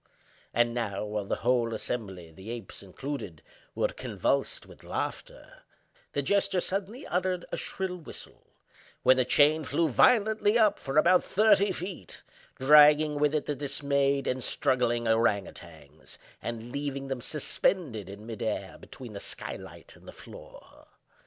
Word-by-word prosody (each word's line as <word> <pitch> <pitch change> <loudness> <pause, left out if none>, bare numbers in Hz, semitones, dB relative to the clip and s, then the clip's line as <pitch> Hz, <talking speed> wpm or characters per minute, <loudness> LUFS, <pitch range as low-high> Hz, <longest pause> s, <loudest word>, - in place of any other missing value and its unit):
And 120 0 +2
now, 105 -4 -3
while 105 -1 -3
the - - -1
whole 120 -2 +2
assembly 95 -8 -5
(the 95 +6 -11
apes 115 -5 -7
included) 100 - -7 0.3
were - - +1
convulsed - - -2
with - - -16
laughter, - - -6 0.5
the 145 - -1
jester 195 +2 +1
suddenly 200 - -3
uttered 180 0 -1
a - - -2
shrill 190 -1 -4
whistle; 165 - -12 0.6
when 130 - +6
the 130 - +2
chain 150 +4 +4
flew 160 +3 0
violently 215 - +4
up 215 -3 +3
for 135 +1 -3
about 175 +4 +5
thirty 205 -1 +3
feet—dragging 150 - +2
with 150 +1 +2
it 150 - -1
the 150 - -1
dismayed 140 0 0
and 130 0 -1
struggling 120 -2 +1
ourang 110 -3 +2
outangs, 80 -3 -13 0.2
and 115 0 -6
leaving 140 -1 -4
them 135 -2 -4
suspended 140 - -1
in 100 +2 -10
mid 115 -2 -7
air 105 -3 -3
between 125 -5 -11
the 100 - -6
sky - - -4
light - - -12
and - - -19
the - - -8
floor. - - -14
135 Hz, 145 wpm, -28 LUFS, 110-165 Hz, 0.6 s, when